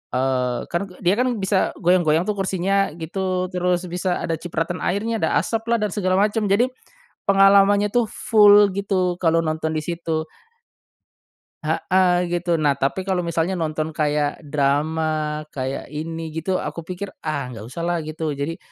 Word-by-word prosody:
eee, 125 -1 0
kan 170 +2 -1
ke 180 - -15
dia 180 +2 +4
kan 255 +1 +2
bisa 190 0 +1
goyang-goyang 170 -3 +3
tuh 210 - +1
kursinya 195 +1 +1
gitu, 185 +2 -2
terus 180 0 +1
bisa 180 +1 -1
ada 165 -1 -2
cipratan 175 +1 -3
airnya, 220 +4 0
ada - - 0
asaplah 230 +1 -1
dan 210 - 0
segala 185 -2 0
macam 210 +1 +1
jadi 215 +6 +3 0.6
pengalamannya 200 +1 +5
tuh 240 -1 +3
full 205 -2 +6
gitu 190 -3 0
kalau 165 -1 +3
nonton 155 0 -2
di 155 - 0
situ. 165 -2 -2 1.4
Heeh, 180 +3 +2
gitu. 175 -1 0
Nah 145 -2 +2
tapi 140 +8 -2
kalau 185 -2 +1
misalnya 170 +2 -1
nonton 155 0 -1
kayak 150 0 0
drama, 150 +2 0 0.5
kayak 130 0 -3
ini 160 0 -5
gitu 180 +3 -1
aku - - -5
pikir, 185 +2 -5 0.2
"Ah, 150 -4 -2
nggak 110 -3 -8
usahlah," 170 +4 -2
gitu 155 0 -3
jadi 145 +4 -3
175 Hz, 155 wpm, -22 LUFS, 155-195 Hz, 1.4 s, full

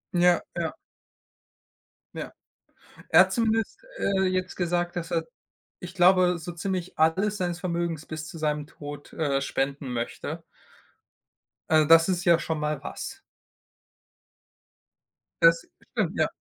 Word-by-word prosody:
Ja, 175 0 +5
ja. - - -2 1.4
Ja. - - -5 0.8
Er - - +7
hat - - +5
zumindest, 225 -2 0 0.2
äh, 195 - +1
jetzt 185 0 -1
gesagt, 175 0 -1
dass 165 -1 -4
er, 165 -2 0 0.5
ich 180 +1 -8
glaube, 180 -1 +5
so 170 +2 -6
ziemlich 185 +1 -4
alles 190 +7 +2
seines 175 -1 -2
Vermögens 170 -3 -2
bis 155 0 -6
zu 165 - -9
seinem 150 -1 -1
Tod, 145 -2 -9
äh, 140 -4 0
spenden 140 -1 -2
möchte. 120 -1 -4 1.3
Äh, 155 -2 +4
das 165 +2 +7
ist 175 -1 0
ja 170 -1 +5
schon 160 -2 -2
mal 150 -2 -2
was. - - -6 2.2
Das 165 0 +6 0.3
stimmt, - - -1
ja. - - +3
170 Hz, 130 wpm, -26 LUFS, 155-180 Hz, 2.2 s, Er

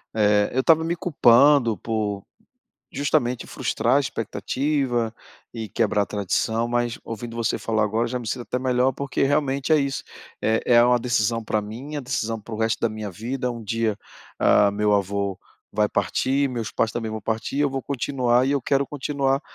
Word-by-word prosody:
eh, 105 -1 +3
eu 130 - +1
estava 160 +3 +4
me 165 +1 -1
culpando 140 - +4
por 105 -2 -2 0.7
justamente 125 -4 0
frustrar 120 +4 0
a - - +4
expectativa 125 0 -1 0.4
e 110 -2 -5
quebrar 105 -1 +1
a - - -3
tradição, 110 +3 -1
mas 120 -1 -1
ouvindo 115 +1 -7
você 115 -1 0
falar 110 -1 0
agora 110 +3 0
já 125 +1 -3
me 120 -3 -6
sinto 120 - -3
até 125 - -3
melhor, 130 0 +2
porque 140 0 -3
realmente 140 +1 +1
é - - +7
isso, 140 -1 -2 0.4
é 110 +1 +2
é 120 -1 +6
uma 125 0 +4
decisão 115 -1 0
pra 110 -1 -1
mim, 120 +8 -8
é - - -1
uma - - -6
decisão 115 -2 -2
para 110 +2 -12
o - - -6
resto 110 0 +1
da 115 - +1
minha 110 -1 -5
vida, 125 +7 -3
um 120 -1 -6
dia, 110 0 -1 0.4
ah, 105 - +5
o - - -2
meu 105 0 +1
avô 100 -1 0 0.4
vai 105 0 +2
partir, 130 - 0
meus 115 -4 -4
pais 115 - 0
também 115 -2 -3
vão 110 -1 -5
partir, 115 +6 -2
eu 145 -1 +2
vou 135 0 -2
continuar 125 -2 +1
e - - +1
eu 140 -1 +1
quero 135 +2 +1
continuar 140 -1 -1
120 Hz, 195 wpm, -23 LUFS, 110-135 Hz, 0.7 s, é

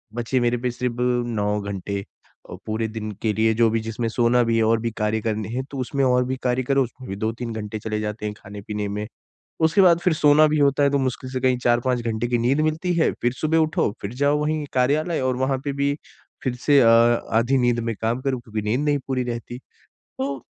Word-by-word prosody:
बचे 120 +2 0
मेरे 120 0 +1
पे 125 +1 -2
सिर्फ़ 125 0 -3
9 120 -4 0
घंटे 100 0 -4 0.5
अ, 90 - -7
पूरे 110 +1 -2
दिन 110 -1 -5
के 110 - +1
लिए, 110 +1 +2
जो 115 0 +3
भी 115 +1 0
जिसमें 115 +1 -2
सोना 120 +1 +2
भी 115 0 +1
है 110 - +3
और 115 +1 +3
भी 115 - -1
कार्य 105 0 0
करने 110 -1 -2
हैं। 130 +3 -3
तो 140 - -6
उसमें 135 +2 -1
और 125 0 +3
भी 130 +1 -2
कार्य 125 0 +1
करो, 135 +1 +2
उसमें 125 0 -9
भी 95 - -3
2-3 115 +1 -3
घंटे 110 0 -5
चले 105 0 -3
जाते 105 0 -4
हैं 105 - -3
खाने 100 +1 -10
पीने 105 0 -4
में। 105 +1 -4 0.6
उसके 180 +5 +2
बाद 170 -2 +6
फिर 180 -2 +2
सोना 150 0 +5
भी 150 0 +1
होता 140 0 +3
है, 140 - +4
तो 140 - +1
मुश्किल 130 0 -3
से 130 -1 -3
कहीं 130 -1 +2
4-5 120 +1 +2
घंटे 110 +1 -1
की 120 -1 +1
नींद 130 +6 +2
मिलती 160 +3 0
है, 165 - +3
फिर 120 0 +2
सुबह 155 +4 0
उठो, 155 -8 +1
फिर 100 +3 -5
जाओ 145 +2 +2
वहीं 150 0 -1
कार्यालय 145 +6 +1
और 130 -1 0
वहाँ 130 +1 0
पे 140 - -1
भी 140 +1 0 0.5
फिर 130 -3 -1
से 145 -2 +6
अ, 115 - +5
आधी 115 +2 +3
नींद 120 -1 +2
में - - -2
काम 115 +3 -1
करो 135 -2 -1
क्योंकि 110 -2 -5
नींद 125 +5 +1
नहीं 145 -1 +2
पूरी 130 -2 -1
रहती। 120 +1 -6 0.4
तो 135 -1 -6
120 Hz, 235 wpm, -23 LUFS, 110-135 Hz, 0.6 s, बाद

